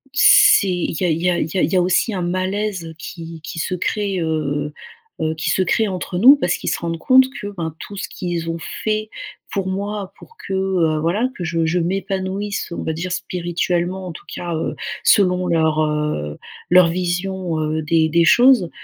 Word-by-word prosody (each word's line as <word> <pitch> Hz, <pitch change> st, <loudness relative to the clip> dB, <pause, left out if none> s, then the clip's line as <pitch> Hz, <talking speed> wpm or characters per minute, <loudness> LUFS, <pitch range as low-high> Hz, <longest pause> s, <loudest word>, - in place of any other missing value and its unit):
c'est 415 Hz, -, +6 dB
il 175 Hz, -2 st, -2 dB
y -, -, +2 dB
a -, -, +2 dB
il 160 Hz, 0 st, 0 dB
y 180 Hz, -, +3 dB
a 175 Hz, -, 0 dB
il 175 Hz, +5 st, 0 dB
y -, -, +3 dB
a 180 Hz, -, +4 dB
aussi 185 Hz, +5 st, +1 dB
un 185 Hz, -, -2 dB
malaise 185 Hz, -1 st, -2 dB
qui 165 Hz, -1 st, -8 dB
qui 165 Hz, -, -8 dB
se 175 Hz, -, -2 dB
crée, 195 Hz, +1 st, -1 dB
heu, 150 Hz, -2 st, -2 dB, 0.5 s
heu, 160 Hz, 0 st, 0 dB
qui 155 Hz, -, -2 dB
se 190 Hz, -, +2 dB
crée 220 Hz, +4 st, +1 dB
entre 180 Hz, -1 st, -4 dB
nous 260 Hz, +8 st, +9 dB
parce 180 Hz, -11 st, 0 dB
qu'ils -, -, -3 dB
se -, -, -1 dB
rendent 165 Hz, -1 st, -3 dB
compte 260 Hz, +5 st, +6 dB, 0.2 s
que 205 Hz, -, -5 dB
ben 160 Hz, -2 st, -4 dB
tout 205 Hz, -, -9 dB
ce -, -, -4 dB
qu'ils 175 Hz, -2 st, -4 dB
ont 165 Hz, 0 st, -3 dB, 0.2 s
fait 215 Hz, 0 st, -1 dB, 0.4 s
pour 195 Hz, -2 st, -2 dB
moi 200 Hz, +1 st, -4 dB
pour 460 Hz, -, -16 dB
que, -, -, -7 dB
heu, 185 Hz, -5 st, +1 dB
voilà 200 Hz, +10 st, +1 dB
que 180 Hz, -, -5 dB
je 165 Hz, 0 st, -1 dB
je 165 Hz, +3 st, 0 dB
m'épanouisse, 195 Hz, +3 st, -3 dB
on -, -, -4 dB
va -, -, -1 dB
dire, 175 Hz, +3 st, -4 dB
spirituellement 175 Hz, +1 st, -2 dB
en -, -, -5 dB
tout 160 Hz, -, -12 dB
cas, 175 Hz, -1 st, -4 dB
heu, 160 Hz, -, -3 dB, 0.3 s
selon 180 Hz, -2 st, +4 dB
leur, 160 Hz, -2 st, +2 dB
heu, 150 Hz, -, -2 dB, 0.3 s
leur 180 Hz, -1 st, +7 dB
vision, 180 Hz, 0 st, -2 dB
heu, 155 Hz, +1 st, -1 dB
des 160 Hz, +1 st, +2 dB
des 170 Hz, +1 st, +3 dB
choses. 240 Hz, -2 st, +5 dB
180 Hz, 200 wpm, -20 LUFS, 165-195 Hz, 0.5 s, nous